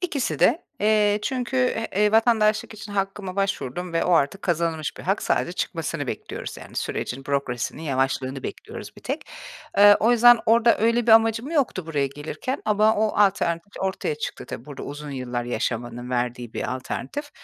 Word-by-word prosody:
İkisi 305 -8 -2
de. 335 - +3 0.2
Eee, 210 -1 +3
çünkü, 255 0 -2
e 225 -5 +1
e, 210 - +2
vatandaşlık 220 -1 +3
için 210 -1 -9
hakkıma 195 -1 -3
başvurdum 180 -3 -2
ve 165 - +1
o 180 - +2
artık 165 +5 +2
kazanılmış 165 -3 -1
bir - - -9
hak. - - 0
Sadece - - 0
çıkmasını - - -3
bekliyoruz, - - -6
yani - - -12
sürecin, 135 +2 -3
bürokrasinin 140 0 -2
yavaşlığını 135 -2 -1
bekliyoruz - - -8
bir - - -14
tek. - - -3 0.5
Eee, 205 0 +9
o 230 +3 +4
yüzden 240 0 +7
orada 230 +1 +5
öyle 230 +1 +2
bir 225 - +6
amacım 225 +4 +4
yoktu 260 - 0
buraya 145 -4 0
gelirken 150 - -5
ama 215 +1 +3
o 215 0 +2
alternatif 190 -2 +1
ortaya 195 - -1
çıktı. 455 - -6
Tabii, - - -7
burada 145 -2 -9
uzun 145 0 -7
yıllar 125 -2 -3
yaşamanın 120 0 -3
verdiği 120 -1 -2
bir 125 - -3
alternatif. 285 - -5
195 Hz, 170 wpm, -24 LUFS, 140-225 Hz, 0.5 s, Eee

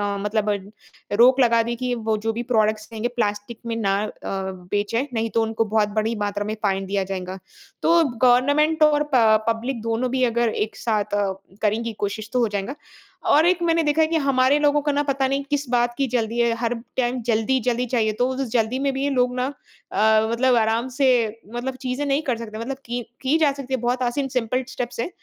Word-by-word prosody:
अ, - - -3
मतलब 210 +1 -1 0.7
रोक 255 +3 +6
लगा 235 -2 +4
दी 235 +1 -3
कि 250 +1 -2
वो 220 -2 -1
जो 225 - +1
भी 235 +2 -3
प्रोडक्ट्स 215 0 +1
रहेंगे 225 +1 -2
प्लास्टिक 210 0 -2
में 230 - -2
ना 200 -4 +1
अ, - - -6 0.6
बेचे 210 +6 0
नहीं 225 -1 -1
तो 230 - +4
उनको 225 0 -1
बहुत 210 -1 +3
बड़ी 225 +2 -1
मात्रा 205 0 -3
में 215 +1 -3
फाइन 195 -1 0
दिया 195 0 -1
जाएगा। 185 0 -5 0.4
तो 335 0 +4
गवर्नमेंट 285 +6 +3
और 300 -1 +4
प 220 -2 +5
पब्लिक 230 +1 -2
दोनों 230 +2 -1
भी 260 0 +1
अगर 235 -1 +2 0.2
एक 220 - -17
साथ 210 -3 -1
अ, 205 -1 +1 0.3
करेंगी 225 +2 0
कोशिश 210 +1 -3
तो 250 - +2
हो 235 - +3
जाएगा 205 +6 -4 0.6
और 310 +2 +5
एक 360 0 +2
मैंने 330 -1 +3
देखा 300 +1 +2
है 315 - +4
कि 325 +1 0
हमारे 275 -1 +3
लोगों 295 0 +3
को 295 - 0
न 285 0 +1
पता 270 -1 +1
नहीं 275 +1 -1
किस 290 -1 -1
बात 240 -1 +2
की 275 - +1
जल्दी 230 -1 -1
है 235 -1 +3
हर 235 0 -1 0.2
टाइम 250 -1 0
जल्दी-जल्दी 240 +2 +1
चाहिए 225 -3 +1
तो 245 - +3
वो 260 - -2
जो 275 - -1
जल्दी 235 +1 0
में 275 - -2
है 270 - -1
भी 275 +1 0
लोग 250 -2 +1
ना 250 0 0 0.5
अ, 220 0 +3
मतलब 250 +2 +3
आराम 225 +2 +1
से 275 -2 +3 0.5
मतलब 255 +2 -3
चीज़े 255 +3 -1
नहीं 280 +2 +1
कर 230 - -1
सकते। 215 -2 -7
मतलब 265 +4 -4
की 240 +1 -3 0.2
की 275 +4 +2
जा 300 -3 +4
सकती 270 -2 -7
है - - -4
बहुत 245 +1 0
आसान 250 +3 -1
सिंपल 250 +2 0
स्टेप्स 245 -2 -5
हैं। 235 - -1
240 Hz, 220 wpm, -23 LUFS, 220-265 Hz, 0.7 s, रोक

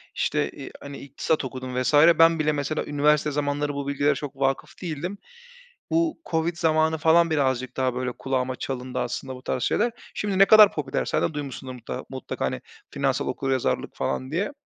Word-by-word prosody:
işte - - 0
i - - -9
hani, 140 0 -8
iktisat 140 +1 -2
okudum 130 -1 -4
vs. 130 - 0 0.3
ben 165 0 +6
bile, 155 0 +2
mesela, 150 +1 -2
üniversite 150 +1 +2
zamanları 145 0 -1
bu 140 0 -4
bilgilere 145 +1 +1
çok 145 -2 -6
vâkıf 135 0 -1
değildim. 175 +3 -4 0.7
Bu 330 0 +1
COVID 165 +1 0
zamanı 160 -1 +2
falan 165 +2 +4
birazcık 130 -4 0
daha 130 -1 0
böyle 125 0 -2
kulağıma 130 0 -2
çalındı 130 -1 -4
aslında 130 -1 -4
bu 125 - -11
tarz 125 - -2
şeyler. 240 - +1 0.2
Şimdi 200 -2 -2
ne 195 - +9
kadar 215 -1 +8
popüler, 140 -3 -2
sen - - 0
de 160 - 0
duymuşsundur 135 -3 -6
mutla 120 -2 -7
mutlaka, 130 -2 -4
hani, - - -3 0.3
"finansal - - 0
okuryazarlık" 135 -2 -1
falan 130 +1 -3
diye. 185 - -1
145 Hz, 175 wpm, -25 LUFS, 130-160 Hz, 0.7 s, ne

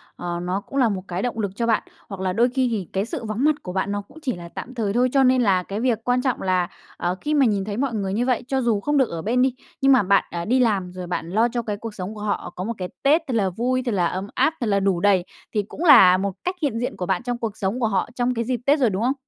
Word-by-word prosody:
ờ, 175 -1 -4
nó 185 +3 -2
cũng 275 - -7
là 240 -4 +4
một 190 -2 -3
cái 180 +2 -3
động 240 -2 -2
lực 200 -3 -1
cho 235 -1 -1
bạn, 225 - +2 0.3
hoặc 195 -1 -6
là 185 -1 0
đôi 235 +5 +3
khi 260 0 +1
thì 200 -6 -3
cái 195 +2 0
sự 255 -2 -5
vắng 215 +4 -2
mặt 305 -1 +4
của 180 - -6
bạn 195 +1 -1
nó 205 - -2
cũng 200 +10 -18
chỉ 255 -7 -2
là 170 -1 -9
tạm 255 - -8
thời 210 -4 -1
thôi? 250 +2 +3
Cho 270 -1 +5
nên 255 0 +4
là 190 -5 +3
cái 200 +3 -5
việc 235 -2 +1
quan 250 0 +1
trọng 260 -2 -1
là, 185 -1 +1 0.3
ờ, 175 +1 -1
khi 300 - -1
mà 280 -3 +4
nhìn 200 -3 +1
thấy 205 +1 -4
mọi 265 -2 -1
người 195 -2 -2
như 235 +4 0
vậy, 250 -2 +1
cho 265 0 0
dù 230 -4 +1
không 295 +8 0
được 265 -4 +3
ở 165 -1 -4
bên 240 +7 +1
đi, 260 -1 +2 0.3
nhưng 270 0 +5
mà 255 -6 +5
bạn, 200 +1 +4
à, 170 0 -4
đi 255 +3 +2
làm 200 -7 +1
rồi 180 -1 -7
bạn 170 -1 -3
lo 220 +6 +3
cho 240 0 -2
cái 210 -3 -4
cuộc 225 0 -7
sống 190 +3 -5
của 210 - -8
họ 205 -4 -3
có 185 - -4
một 230 +3 -2
cái 180 -1 -4
Tết 295 +4 +4
thật 250 - -2
là 195 -4 +2
vui, 250 +7 -1
thật 240 - 0
là 180 -3 +2
ấm 190 +3 -4
áp, 270 +5 +3
thật 235 - 0
là 200 -1 +2
đủ 195 -3 +1
đầy, 190 -2 +3 0.3
thì 210 -2 +1
cũng 325 - -6
là 195 - +8
một 195 +1 -2
cách 365 +1 -1
hiện 275 -7 0
diện 245 - -3
của 180 - -3
bạn 190 +5 -1
trong 245 -1 -2
cuộc 225 -3 -4
sống 200 +5 -1
của 230 - +2
họ, 195 +2 0
trong 250 0 0
cái 235 -1 -1
dịp 250 -2 -1
Tết 290 +2 +4
rồi, 250 -4 +3
đúng 195 +2 -2
không? 255 +3 +2
220 Hz, 320 wpm, -23 LUFS, 190-250 Hz, 0.3 s, là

